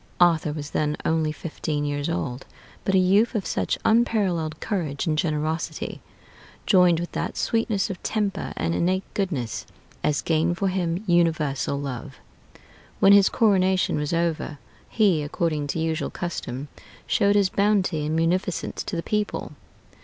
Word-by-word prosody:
Arthur 165 -3 +4
was 145 -1 -6
then 150 -1 0
only 160 -1 +1
fifteen 150 -1 -3
years 145 0 -2
old, 125 +10 -3 0.4
but 195 - +1
a - - +6
youth 200 +6 +3
of 205 - -1
such - - -1
unparalleled 195 -9 +2
courage 165 -10 -2
and 155 - +1
generosity, 155 0 -2 0.6
joined 180 -4 +5
with 175 - -4
that - - -3
sweetness 225 -3 0
of 185 - -8
temper 210 -3 -2
and 165 - 0
innate 185 +3 +1
goodness, 150 - -2 0.4
as 150 -1 +1
gained 165 +2 +1
for 195 0 +1
him 180 0 -1
universal 155 -6 +1
love. 135 0 -6 0.8
When 195 - +7
his 200 -1 +6
coronation 190 -4 +2
was 150 -1 -2
over, 165 -3 -1 0.3
he, 200 -8 +3
according 150 0 -1
to 150 - -2
usual 160 0 -1
custom, 150 -6 -5 0.4
showed 200 0 +2
his 200 -2 +4
bounty 195 -5 +1
and 155 +1 -1
munificence 175 +3 0
to 195 - -4
the 165 - -2
people. 210 -1 -2
170 Hz, 145 wpm, -24 LUFS, 150-195 Hz, 0.8 s, When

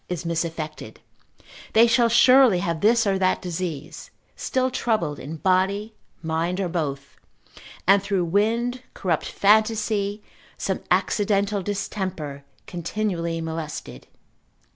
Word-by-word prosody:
is 180 -2 -4
misaffected, 165 -2 -4 0.8
they 225 +1 +7
shall 235 0 +3
surely 250 -2 +6
have 170 -2 -2
this 225 +2 +4
or 195 -1 +1
that 185 -1 +2
disease; 170 -4 -5 0.3
still 260 0 -1
troubled 175 -13 -1
in 150 +4 -7
body, 195 +5 +1 0.3
mind, 165 +3 -1
or 190 - 0
both, 140 -5 -4 0.7
and 195 +2 +5
through 195 -3 0
wind, 230 +7 0
corrupt 170 -5 -1
fantasy, 210 -1 +1 0.3
some 190 - -2
accidental 200 +2 +1
distemper, 185 -7 -4 0.2
continually 170 -1 -3
molested. 160 -1 -6
190 Hz, 110 wpm, -24 LUFS, 165-215 Hz, 0.8 s, they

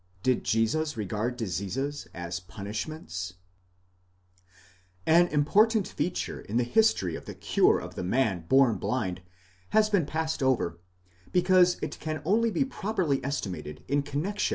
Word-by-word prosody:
DID 130 -2 +2
JESUS 145 +8 +1
REGARD 110 +4 -2
DISEASES 115 +7 -3
AS 85 0 -5
PUNISHMENTS? 100 - -6 1.7
An 170 +2 +5
important 200 +8 +3
feature 180 - -3
in 110 - -3
the 125 - +3
history 120 - +2
of - - -8
the - - -7
cure - - +3
of - - -7
the - - -5
man 95 -4 0
born 135 -4 +5
blind 95 -8 -2 0.5
has 215 0 +3
been 180 -8 +2
passed 160 -1 -2
over, 120 -11 +1 0.5
because 180 0 +4
it - - -4
can 155 0 -3
only 225 +6 +3
be 270 +5 +1
properly 190 - -1
estimated 90 - -4
in 145 +2 +2
connexion. 160 +9 -1
135 Hz, 135 wpm, -28 LUFS, -, 1.7 s, An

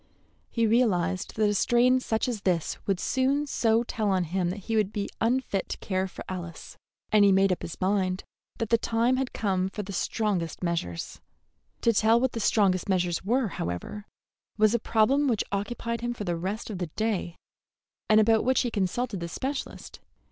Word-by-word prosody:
He 230 -1 +1
realized 190 -6 +1
that 215 -1 +2
a 205 - +1
strain 240 +5 +3
such 225 -2 -1
as 235 -5 -3
this 175 -5 0
would 195 -3 +1
soon 270 +3 +1
so 230 -4 +2
tell 220 -3 -2
on 190 -2 +2
him 175 +1 -1
that 195 +3 -5
he 225 +4 -3
would 210 -2 +2
be 205 -2 -3
unfit 230 -4 0
to - - -3
care 190 -1 -2
for - - -10
Alice, 175 -3 -7 0.4
and 210 -1 +6
he 200 - +6
made 195 0 +4
up 180 - -1
his 165 - -7
mind 185 -1 0 0.3
that 225 -1 -3
the 230 - +5
time 235 +3 +1
had 265 -1 -2
come 190 -3 0
for 210 +2 -5
the 200 +1 -7
strongest 185 -4 -1
measures. 165 - -3 0.6
To 230 - +3
tell 220 +2 +4
what 260 0 +1
the 230 - -4
strongest 195 -3 +2
measures 180 -2 0
were, 235 +3 +1
however, 90 - -5 0.5
was 215 0 +4
a 235 - +2
problem 250 +7 +2
which 230 -5 +1
occupied 230 +3 -3
him 240 0 -2
for 210 - -5
the 175 -3 -1
rest 195 +7 -4
of 190 - -5
the 180 - -2
day, 195 -1 -2 0.7
and 215 0 +6
about 220 +1 +4
which 260 +1 +3
he 240 - -1
consulted 205 +2 -1
the 170 0 -5
specialist. 270 - -5
210 Hz, 190 wpm, -27 LUFS, 185-230 Hz, 0.7 s, and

